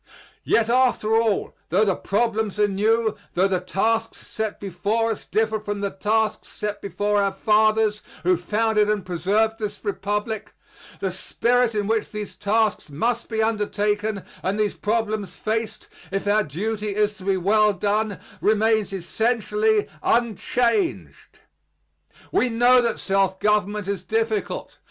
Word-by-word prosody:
Yet 225 -1 +2
after 240 -3 +2
all, 225 -3 +1 0.2
tho 195 +6 +3
the 195 -3 +2
problems 220 -1 -1
are 210 0 +4
new, 220 +3 +1 0.2
tho 185 +2 +4
the 185 -2 0
tasks 225 +5 -1
set 220 -1 -4
before 210 +4 -1
us 220 - -5
differ 220 0 0
from 205 -1 -4
the 200 -1 -1
tasks 215 +2 0
set 210 -1 -5
before 205 +2 0
our 200 0 +1
fathers, 215 +1 +2 0.2
who 180 +1 +4
founded 210 +4 +1
and 210 -3 0
preserved 205 +6 0
this 210 0 -5
Republic, 210 +1 -3 0.5
the 190 - -1
spirit 235 +5 +1
in 205 -1 0
which 220 +1 0
these 210 -1 -6
tasks 210 -2 0
must 230 +12 -1
be 220 -1 0
undertaken 210 -1 -1 0.2
and 195 +3 -1
these 210 -2 0
problems 215 -4 -2
faced, 220 0 -3 0.2
if 195 +1 -2
our 210 +1 +3
duty 210 +6 -3
is 210 0 +1
to 190 - -12
be 195 0 +1
well 210 +3 +3
done, 205 +2 -1 0.2
remains 220 0 +2
essentially 245 - 0
unchanged. 240 - 0 0.9
We 255 - +2
know 245 +2 +5
that 235 -2 -1
self 195 -1 +1
government 210 -1 +1
is 200 -3 -2
difficult. 220 +1 -2
210 Hz, 140 wpm, -23 LUFS, 200-225 Hz, 0.9 s, know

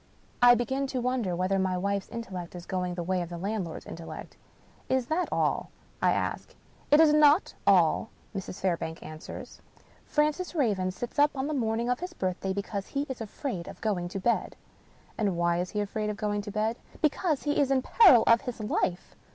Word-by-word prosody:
I 245 0 +8
begin 265 +3 -1
to 260 -1 -2
wonder 245 -7 0
whether 185 +2 +1
my 185 -1 0
wife's 200 +1 -1
intellect 190 -7 -6
is 175 -1 -8
going 180 -2 -2
the 175 - -3
way 185 +1 0
of 170 - -5
the 175 - -6
landlord's 190 -2 -4
intellect. 165 0 -8 0.3
" - - -30
Is 255 - -2
that 320 +7 -1
all? - - 0 0.2
" - - -32
I - - +4
ask. - - -2 0.2
" - - -30
It 295 - +6
is 315 -2 +6
not 300 +3 +5
all," 185 +2 +4 0.3
Mrs. 190 -1 -5
Fairbank 170 -3 -2
answers. 155 0 -9 0.2
" - - -30
Francis 305 +4 +1
Raven 205 - +1
sits 240 +9 -5
up 290 +1 +6
on 265 - -1
the 305 - -2
morning 230 -3 0
pf 250 0 0
his 360 0 -6
birthday 185 - -2
because 200 0 -3
he 280 0 -2
is 260 -3 -5
afraid 215 - -4
to - - -8
go 190 -5 -1
to 190 +2 -5
bed." 235 +5 0 0.3
" - - -30
And 200 -5 +1
why 170 0 +2
is 180 +1 -2
he 210 - -2
afraid 210 +1 -2
to 210 - -2
go 205 0 -1
to 205 - -7
bed? 220 +3 0
" - - -28
" - - -30
Because 305 0 +1
he 290 0 0
is 280 -2 +3
in 265 -1 +2
peril 330 - +7
of 230 0 +5
his 250 -4 -6
life." 190 -4 -2
210 Hz, 215 wpm, -28 LUFS, 185-265 Hz, 0.3 s, I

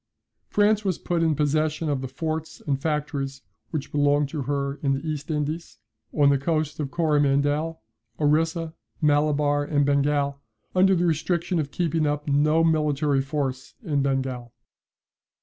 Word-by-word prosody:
France 210 +1 +3
was 190 -4 0
put 175 -1 -1
in 160 -2 +2
possession 155 +2 0
of 140 -3 0
the 130 - -4
forts 160 +3 -4
and 140 -2 -1
factories 140 -3 -2 0.3
which 155 -4 -4
belonged 145 0 +2
to 150 -1 -4
her 140 0 -2
in 140 -2 +1
the 135 +4 -4
East 150 -1 -4
Indies, 155 +2 -3 0.3
on 145 -2 +4
the 140 -1 +3
coasts 155 +1 -1
of 145 -3 -2
Coromandel, 145 -1 +1 0.4
Orissa, 160 +2 +1 0.3
Malabar, 145 -1 +2
and 145 -1 +1
Bengal 140 0 +1 0.3
under 190 +1 +4
the 175 0 +1
restriction 170 +2 0
of 145 -2 -2
keeping 165 -1 0
up 145 0 -2
no 150 +3 +3
military 150 -3 +2
force 135 -1 -3
in 150 -7 0
Bengal. 130 -3 -2
150 Hz, 150 wpm, -25 LUFS, 140-160 Hz, 0.4 s, on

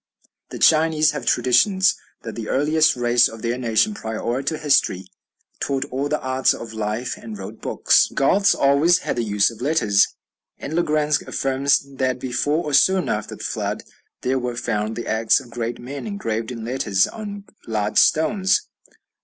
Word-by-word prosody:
The - - -7
Chinese 155 -1 +4
have 150 - -6
traditions 185 - +3 0.3
that 115 - -6
the 115 -2 -6
earliest 155 +3 +2
race 120 -1 +3
of 115 0 -11
their 120 +1 -1
nation, 120 - +1
prior 115 - -3
to 155 +3 -2
history, 140 -11 +1 0.5
"taught 135 -1 -1
all 135 +3 -2
the 150 - 0
arts 130 0 +1
of 115 -1 -9
life 110 +3 -3
and 110 -2 -9
wrote 100 +3 -9
books." - - +3
"The - - -16
Goths 195 +9 +3
always 140 +6 +4
had - - -2
the 120 - 0
use 105 0 +2
of 115 0 -13
letters;" 125 -9 +3 0.5
and 145 - -7
Le 170 - +2
Grand 150 -2 +1
affirms 135 +1 +1
that 130 -1 0
before 145 +6 -1
or 150 - -4
soon 185 +6 +3
after 105 0 -3
the - - -10
Flood - - -3 0.4
"there 130 +1 0
were 125 -1 -4
found 110 -1 -2
the 120 - -5
acts 110 +4 +2
of 125 -3 -14
great 120 0 -4
men 140 - -7
engraved 115 - -3
in 115 -2 -6
letters 110 -6 +1
on 205 -2 -7 0.2
large 105 -2 0
stones." 190 - +3
130 Hz, 175 wpm, -21 LUFS, 115-150 Hz, 0.5 s, Chinese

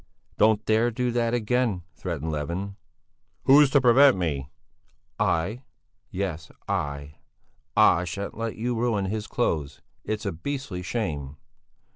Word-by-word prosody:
"Don't 110 0 +4
dare 110 +2 +3
to 115 - -10
do 125 0 0
that 120 0 +1
again!" 115 -5 0
threatened 80 -3 -4
Levin. 85 +7 -3 0.7
"Who's 140 +1 +7
to 140 - +5
prevent 130 0 +6
me?" 70 -6 -2 0.7
"I! 100 +10 0 0.5
Yes, 85 -5 -4 0.2
I! 70 0 -3 0.6
I 85 +2 +5
shan't 100 +4 -5
let 115 0 -3
you 120 +3 -2
ruin 115 -4 0
his 105 +2 -3
clothes. 75 - -2 0.2
It's 110 0 -3
a 100 - 0
beastly 120 - -5
shame!" 75 - -3
105 Hz, 130 wpm, -26 LUFS, 80-120 Hz, 0.7 s, Who's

